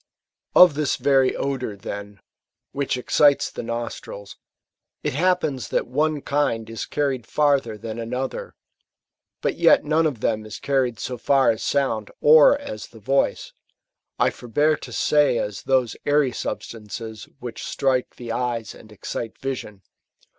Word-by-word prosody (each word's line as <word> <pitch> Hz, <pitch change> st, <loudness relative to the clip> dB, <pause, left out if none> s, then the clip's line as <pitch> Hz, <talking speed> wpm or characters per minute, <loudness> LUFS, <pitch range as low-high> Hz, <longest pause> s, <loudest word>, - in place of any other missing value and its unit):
Of 180 Hz, -3 st, +9 dB
this 145 Hz, -1 st, 0 dB
very 135 Hz, -2 st, +3 dB
odour, 130 Hz, -6 st, -3 dB
then, 100 Hz, 0 st, -8 dB, 0.5 s
which 140 Hz, -2 st, -1 dB
excites 140 Hz, +3 st, +3 dB
the -, -, -6 dB
nostrils, 115 Hz, -3 st, -6 dB, 0.7 s
it -, -, -1 dB
hap 180 Hz, +5 st, +2 dB
pens 130 Hz, -5 st, -3 dB
that -, -, 0 dB
one 150 Hz, +3 st, 0 dB
kifid 115 Hz, -6 st, 0 dB
is 115 Hz, -, -5 dB
carried 135 Hz, -5 st, -1 dB
farther 140 Hz, -7 st, +1 dB
than 110 Hz, +2 st, -6 dB
another; 125 Hz, +3 st, -4 dB, 0.9 s
but -, -, -1 dB
yet -, -, +5 dB
none 155 Hz, +2 st, +3 dB
of 135 Hz, -7 st, -4 dB
them 110 Hz, 0 st, 0 dB
is 110 Hz, 0 st, -8 dB
carried 130 Hz, -4 st, 0 dB
so 125 Hz, -2 st, -4 dB
far 135 Hz, +1 st, +4 dB
as 110 Hz, -, -4 dB
sound, 130 Hz, -7 st, 0 dB
or 155 Hz, -, +7 dB
as 285 Hz, -1 st, -7 dB
the -, -, -15 dB
voice; -, -, 0 dB, 0.3 s
— -, -, -55 dB
I -, -, +3 dB
forbear 145 Hz, +6 st, +1 dB
to -, -, -10 dB
say 145 Hz, -5 st, +3 dB
as 105 Hz, -1 st, -3 dB
those 130 Hz, -4 st, +1 dB
airy 145 Hz, -2 st, +2 dB
substances 110 Hz, -1 st, -6 dB
which 120 Hz, -3 st, -7 dB
strike 130 Hz, -2 st, 0 dB
the 120 Hz, -2 st, -7 dB
eyes, 120 Hz, -1 st, -2 dB
and 110 Hz, -, -15 dB
excite 110 Hz, +2 st, -6 dB
vision. 115 Hz, -7 st, -5 dB
130 Hz, 150 wpm, -23 LUFS, 115-145 Hz, 0.9 s, Of